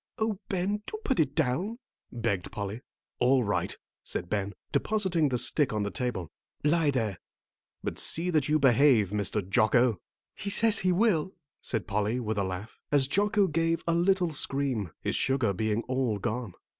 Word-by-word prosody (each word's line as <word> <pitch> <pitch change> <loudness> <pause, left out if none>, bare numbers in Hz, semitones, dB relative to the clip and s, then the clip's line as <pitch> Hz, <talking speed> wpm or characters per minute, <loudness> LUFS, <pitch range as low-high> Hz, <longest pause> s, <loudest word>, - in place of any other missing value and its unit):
"Oh, 220 -4 -1
Ben, 195 +3 -1
do 430 - -4
put 265 - +1
it 145 -3 +1
down," 165 - 0 0.3
begged 110 -6 -2
Polly. 100 +3 -5 0.4
"All 125 +1 +4
right," 105 -1 -1 0.3
said 85 - -4
Ben, 100 -1 -1 0.2
depositing 185 -8 +1
the 125 - 0
stick 145 +3 +3
on 105 -2 -1
the 100 - -3
table. 115 - -3 0.3
"Lie 155 +1 +3
there, 110 -9 -1 0.6
but - - -3
see 175 +2 -1
that 150 -4 +2
you 155 - +4
behave, 130 -6 +4
Mr. 105 -1 -1
Jocko." 115 0 +3 0.3
"He 200 - -5
says 220 +1 +3
he 185 -1 +2
will," 190 -3 +2 0.3
said 115 -4 -2
Polly, 105 +3 0
with 110 -3 -2
a - - +1
laugh, 95 +3 -6
as 140 -2 +4
Jocko 205 +5 +2
gave 165 0 0
a 170 - +1
little 175 0 +2
scream, 135 - -1
his - - 0
sugar 130 -6 +2
being 110 +3 -1
all 130 -4 -1
gone. 115 -1 -3
130 Hz, 170 wpm, -28 LUFS, 105-170 Hz, 0.6 s, All